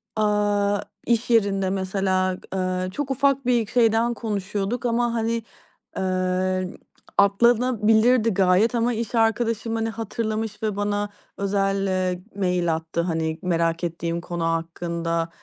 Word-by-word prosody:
aaa, 205 -1 +1 0.3
iş 235 0 +1
yerinde 200 -4 +2
mesela, 190 -1 0 0.2
eee, 185 -1 -1
çok 275 +6 -3
ufak 275 0 +2
bir 240 -4 +2
şeyden 230 0 +3
konuşuyorduk 210 +1 -3
ama 240 0 +1
hani, 230 0 -1 0.5
eee, 185 0 0 0.5
atlanabilirdi 230 +2 +4
gayet 195 +5 +3
ama 235 +1 +1
iş 230 +1 -3
arkadaşım 225 0 +1
hani 225 0 -1
hatırlamış 220 0 -3
ve 215 -2 0
bana 205 0 -1 0.3
özel, 195 0 0
eee, 185 -1 -1
mail 180 -4 +1
attı. 165 +1 -3
Hani, 160 -2 -2
merak 165 -1 0
ettiğim 170 0 -2
konu 170 -1 -3
hakkında 165 0 -2
200 Hz, 120 wpm, -24 LUFS, 185-225 Hz, 0.5 s, atlanabilirdi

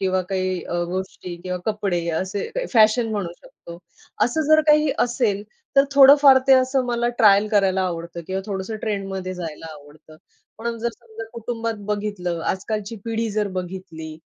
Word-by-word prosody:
किंवा 185 -1 +1
काही 185 -2 -1
अ, - - -5 0.2
गोष्टी 185 -1 -5
किंवा 180 -1 -3
कपडे 195 -5 -1
असे 190 +2 -3
काही - - -2
फॅशन 225 0 +4
म्हणू 195 -5 -3
शकतो, 170 0 -13 0.5
असं 280 +6 -1
जर 310 0 +6
काही 300 -1 +5
असेल 235 -5 -1 0.3
तर 275 - +7
थोडंफार 275 -1 +8
ते - - +8
असं 260 0 +2
मला 240 0 0
ट्रायल 210 -1 +5
करायला 195 -2 +2
आवडतं 170 -1 -4
किंवा 190 +1 -2
थोडंसं 200 +1 -4
ट्रेंडमध्ये 195 -3 -3
जायला 165 -2 -7
आवडतं, 150 +1 -16 0.4
पण 235 +1 -3
जर 235 - -1
समजा 225 -1 -10
कुटुंबात 230 0 -4
बघितलं 205 -5 -3
आजकालची 210 +3 -4
पिढी 230 0 -2
जर 210 0 -1
बघितली. 180 -3 -7
205 Hz, 155 wpm, -22 LUFS, 185-230 Hz, 0.5 s, थोडंफार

